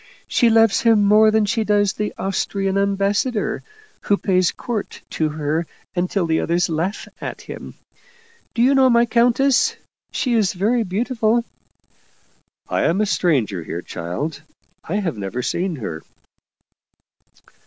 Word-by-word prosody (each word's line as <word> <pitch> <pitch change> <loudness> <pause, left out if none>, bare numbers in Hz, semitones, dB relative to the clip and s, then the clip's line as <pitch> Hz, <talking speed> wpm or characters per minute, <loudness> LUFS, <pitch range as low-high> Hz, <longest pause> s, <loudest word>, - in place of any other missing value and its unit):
She 240 - +3
loves 225 +1 +4
him 225 -4 +4
more 215 +2 +6
than 215 0 +2
she 220 +2 0
does 205 -2 +2
the 210 0 -3
Austrian 195 0 -1
ambassador, 200 +3 0 0.4
who 205 - +1
pays 185 -3 +2
court 230 -4 -5
to 155 -1 0
her 155 +2 -2 0.3
until 180 +1 0
the 160 -1 +1
others 175 +1 0
laugh 170 +6 -2
at - - -6
him. - - -9 0.8
Do 235 - +2
you 265 +3 +5
know 265 -1 +5
my 235 0 +4
countess? 245 +3 +3 0.4
She 250 - -1
is 215 -5 +2
very 220 +6 +1
beautiful." 230 +3 0 0.7
" - - -37 0.5
I - - 0
am 170 +4 +2
a 215 - +3
stranger 130 - 0
here, 85 +2 -6
child. 135 - -5 0.4
I 175 - -4
have 175 - -2
never 100 +6 -4
seen 180 +4 -1
her." 85 - -6
200 Hz, 145 wpm, -21 LUFS, 165-225 Hz, 0.8 s, more